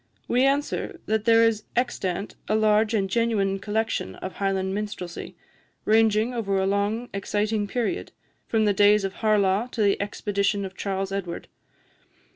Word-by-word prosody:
we 250 +2 +2
answer, 280 +2 0
that 220 -1 0
there 230 0 +6
is 225 -2 +2
extant 200 -6 -2
a 215 - +2
large 215 +1 +3
and 195 -2 +1
genuine 200 -2 +1
collection 210 - -2
of 185 - -7
Highland 190 -1 -1
minstrelsy, 205 -4 -5 0.5
ranging 220 +2 +3
over 200 -5 -1
a 190 - +1
long 205 +4 0
exciting 205 +1 -1
period, 245 - -2 0.4
from 220 -1 +2
the 205 - +3
days 205 +1 +5
of 195 0 -2
Harlaw 210 0 +2
to 235 -3 -2
the 200 -1 +2
expedition 200 0 -1
of 190 0 -8
Charles 195 0 -3
Edward. 185 -3 -5
210 Hz, 150 wpm, -25 LUFS, 195-225 Hz, 0.5 s, there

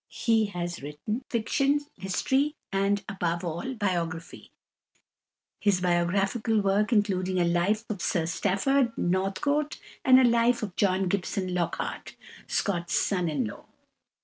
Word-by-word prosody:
He 225 -1 +2
has 175 -3 -4
written 150 - -4
fiction, 275 +5 +1 0.2
history, 265 - 0 0.2
and, 195 +1 +1
above 175 -3 -2
all, 175 +10 -4
biography, 175 -5 -3 1.1
his 200 -3 +2
biographical 195 +5 +1
work 200 +2 +1
including 190 -4 +1
a 175 - +3
Life 180 +6 +1
of 205 -4 -4
Sir 170 -3 0
Stafford 230 +9 +1
Northcote 195 +12 0 0.2
and 260 0 +7
a - - +5
Life 235 0 +3
of 195 -4 -5
John 190 -1 +2
Gibson 185 0 -2
Lockhart, 175 -2 -3 0.3
Scott's 175 -4 0
son 180 -4 +1
in 140 -5 -1
law. 105 - -8
195 Hz, 125 wpm, -27 LUFS, 175-225 Hz, 1.1 s, and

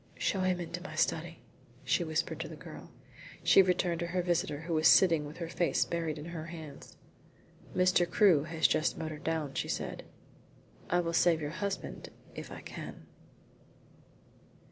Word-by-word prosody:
"Show 195 - 0
him 185 -1 +1
into 175 0 -5
my 190 - -8
study," - - -1 0.4
she 175 - +1
whispered 160 -1 -2
to 165 - -4
the 160 - -9
girl. - - -11 0.5
She - - +7
returned 180 -2 +1
to 170 - -2
her 180 +1 -1
visitor, 160 -4 0
who 165 +1 -4
was 155 0 +4
sitting 165 -5 +6
with 150 - -10
her 170 - -4
face 170 +1 +1
buried 165 -2 -2
in 150 - -7
her 160 -1 -5
hands. 160 -4 -10 0.8
"Mr. 180 -1 +3
Crewe 180 -10 +4
has 160 0 -1
just 155 - +1
motored 155 -2 -5
down," 160 -4 -2
she - - -2
said. - - -3 0.9
"I 175 +1 +3
will 170 -1 -3
save 165 -1 +4
your 145 -1 -4
husband 200 +3 -4 0.2
if - - -8
I - - -8
can." - - -9
165 Hz, 165 wpm, -31 LUFS, 155-180 Hz, 0.9 s, She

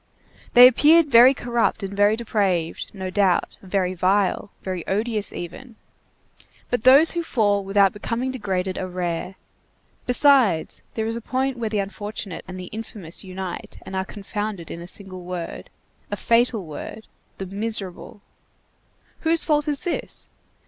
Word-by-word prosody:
They 245 +1 +11
appeared 300 +4 +5
very 250 +3 +8
corrupt 235 -3 0
and 195 +1 -5
very 205 +1 +4
depraved, 195 -7 -1
no 190 -2 -6
doubt, 190 -3 +1
very 185 -1 -1
vile, 190 +2 +1
very 185 -3 -4
odious 215 +1 -1
even; 220 +8 -8 1.0
but 245 -2 -1
those 275 +5 +8
who 340 - -1
fall 205 -10 +1
without 195 -1 +3
becoming 235 +5 -3
degraded 190 -6 -3
are 185 - -3
rare; 180 0 -4 0.7
besides, 250 - +4
there 220 - -1
is 225 +1 -2
a - - -6
point 260 +2 -2
where 225 -2 -2
the 215 - -2
unfortunate 205 -1 -5
and 185 0 -7
the 180 - -8
infamous 210 -6 -6
unite 185 -1 -7
and 190 - -8
are 190 - 0
confounded 205 -2 -5
in 170 - -7
a 170 - -9
single 185 -1 -9
word, 175 -1 -6 0.4
a - - -3
fatal 230 -4 +2
word, 165 +8 -8 0.3
the 195 - -5
miserable; 200 0 -4 1.0
whose 330 0 +3
fault 300 -1 +1
is 290 -2 -2
this? 350 - -5
205 Hz, 150 wpm, -23 LUFS, 185-235 Hz, 1.0 s, They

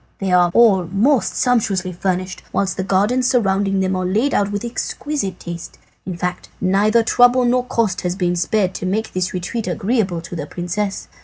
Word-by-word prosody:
They 195 -2 -2
are 180 -1 +5
all 205 -6 +5
most 225 - +1
sumptuously 200 -7 +1
furnished, 185 0 -2
whilst 190 -2 0
the 190 - -2
gardens 210 +7 +1
surrounding 195 -5 +1
them 190 0 0
are 185 - -1
laid 215 +10 +1
out 200 0 +1
with 205 +3 -3
exquisite 235 - -3
taste. 170 -1 -8 0.3
In 180 -2 -4
fact, 180 +1 -4
neither 205 +5 +3
trouble 245 +2 +4
nor 250 +1 +2
cost 230 -5 0
has 180 0 -2
been 180 -2 0
spared 185 +2 0
to 185 - -4
make 215 +4 -2
this 185 0 -1
retreat 185 +5 -4
agreeable 190 -1 0
to 170 +1 -8
the 150 -3 -5
princess. 195 +5 -3
195 Hz, 180 wpm, -19 LUFS, 180-225 Hz, 0.3 s, are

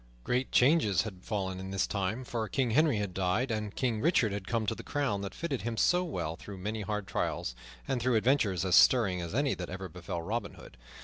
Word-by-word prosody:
Great 125 - 0
changes 125 - +4
had 95 -5 -8
fallen 95 -4 -3
in 95 0 -6
this 95 -1 0
time; 100 +5 -2
for 115 -3 -3
King 130 -4 0
Henry 145 -1 +4
had 100 -3 -2
died 95 +8 0
and 105 -2 -3
King 115 -4 0
Richard 150 - +3
had 100 -1 -5
come 115 -1 0
to - - 0
the - - -8
crown 135 -9 -1
that 100 -1 -6
fitted 150 -7 -3
him 115 -1 -3
so 180 +8 +3
well 85 - -3
through 100 +3 -9
many 105 +4 -3
hard 105 -1 -3
trials, - - -2 0.3
and 130 -2 -1
through 125 0 +2
adventures 110 -6 +2
as 95 - 0
stirring 100 -8 +5
as 85 +4 -5
any 140 0 +2
that 90 - -6
ever 95 +1 -5
befell 85 -2 -6
Robin 110 +3 -3
Hood. - - -13
105 Hz, 225 wpm, -30 LUFS, 95-125 Hz, 0.3 s, stirring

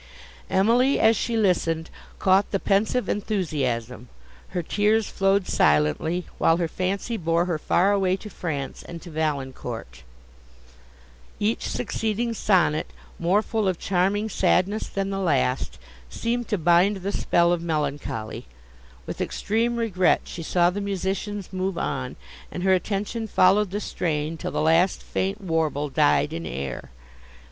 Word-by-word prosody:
Emily, 235 +8 +3
as 220 +1 +5
she 230 +2 -1
listened, 170 -5 +1 0.3
caught 190 +1 +3
the 195 - 0
pensive 215 +6 +1
enthusiasm; 130 - -2 0.4
her 180 -2 -3
tears 210 +4 +2
flowed 195 0 +1
silently, 75 - +2
while 165 - +4
her 170 -1 0
fancy 195 +7 -2
bore 170 -1 +1
her 170 -4 -2
far 185 +5 +2
away 190 -2 +2
to 195 - -9
France 155 -8 -4
and 170 0 -9
to 175 - -10
Valancourt. 135 -6 -4 1.4
Each 215 +2 0
succeeding 225 0 -2
sonnet, 185 -8 +2 0.3
more 185 +5 +2
full 220 -3 -1
of 185 -2 0
charming 195 +4 0
sadness 200 0 +1
than 195 0 -3
the 195 - -2
last, 140 -8 0 0.3
seemed 235 - -2
to 210 - 0
bind 175 +4 +4
the 195 +2 -3
spell 170 -2 +2
of 175 - -1
melancholy: 145 - -3 0.6
with - - -5
extreme 230 +3 0
regret 205 -6 +2
she 175 - -8
saw 175 +2 +2
the 205 +3 -4
musicians 195 0 -3
move 185 -1 -2
on, 65 - -3 0.4
and 180 - -5
her 190 0 +4
attention 210 +4 -1
followed 195 +1 +4
the 205 +3 -3
strain 160 -5 -2
till 160 - -5
the - - -2
last 165 +4 +3
faint 195 +2 -2
warble 160 -5 -1
died 150 +1 +2
in 165 +1 -4
air. 65 -2 -5
185 Hz, 140 wpm, -24 LUFS, 160-205 Hz, 1.4 s, as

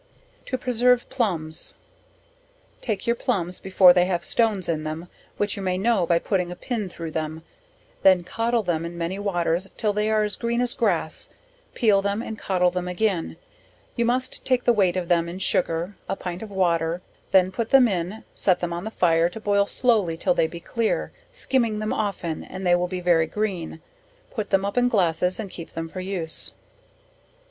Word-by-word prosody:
To 255 - -1
preserve 250 0 +2
Plumbs. 170 - -2 1.1
Take 215 -5 -3
your 235 - +2
plumbs 185 -9 -2
before 185 -1 +6
they 180 0 +4
have 180 -2 -1
stones 215 -6 +1
in 155 -2 -1
them, 155 +3 -5 0.3
which 205 -1 0
you 200 - -5
may 185 -1 0
know 200 -3 +2
by 170 - +4
putting 180 -1 -1
a - - -5
pin 215 0 -3
through 165 -2 -7
them, 155 0 -4 0.6
then 185 -2 +5
codle 230 +5 0
them 165 -2 0
in 170 +1 -6
many 170 +3 -3
waters 180 -2 0
till 210 -2 +1
they 210 +1 0
are 215 -1 +3
as 210 -1 -2
green 235 0 -1
as 245 -1 +1
grass, - - -1 0.5
peel 210 -5 +4
them 200 +3 -1
and 220 -2 -6
coddle 180 -2 +2
them 180 0 -3
again; 180 -1 -1 0.6
you 235 - +1
must 250 +2 -1
take 255 -1 +1
the 240 - +4
weight 190 -4 +2
of 180 -2 -2
them 170 -1 +2
in 175 - -6
sugar, 175 0 0
a - - 0
pint 180 -2 -6
of 220 - -7
water, 170 -3 0 0.3
then 185 -1 +4
put 225 +3 -3
them 270 -2 +7
in, 190 +1 -3
set 185 -3 +2
them 175 -1 -2
on 175 +3 -5
the - - -2
fire, 170 -5 +3
to 200 - -8
boil 200 -1 +2
slowly 210 -11 +2
till 270 - +2
they 160 - +2
be 170 +1 -8
clear, 230 +5 -1 0.2
skiming 250 - 0
them 215 0 -2
often, 195 -6 -2
and 190 0 -7
they 175 - +4
will 175 0 +2
be 180 0 -4
very 170 -2 +3
green; 185 -4 -3 0.5
put 215 -4 -4
them 195 0 +2
up 200 +5 0
in 245 0 +3
glasses 180 -3 +1
and 200 -4 -5
keep 170 - -9
them 165 0 -4
for 185 +3 -7
use. 185 -4 -3
190 Hz, 195 wpm, -24 LUFS, 175-220 Hz, 1.1 s, them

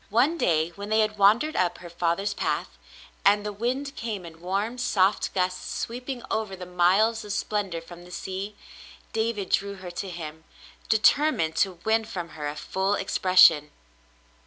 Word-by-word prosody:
One 250 +10 +3
day 160 - +1
when 200 +4 -8
they 220 0 +4
had 215 -1 -1
wandered 225 +10 +4
up 175 -1 +1
her 175 - -10
father's 175 +4 0
path, 65 - -2 0.5
and 205 +1 +4
the 210 - -3
mnd 260 +6 -2
came 215 -6 -4
in 165 -1 -12
warm, 200 +7 -2
soft 200 -5 +2
gusts, 185 0 -1
sweeping 250 +1 -5
over 215 -3 -1
the 180 -1 -8
miles 190 +6 +3
of 210 - -7
splendor 200 -5 -2
from 175 +1 -12
the 175 - -14
sea, 190 +3 -5 0.6
David 220 -4 -1
drew 200 0 +1
her 185 -2 -8
to 190 +2 -5
him, 160 -2 -7 0.5
determined 220 - +3
to 190 -2 +2
win 220 0 +2
from 180 -6 -5
her 150 -2 -5
a 145 - -4
full 190 +5 -1
expression. 185 -6 +5
195 Hz, 165 wpm, -26 LUFS, 175-220 Hz, 0.6 s, expression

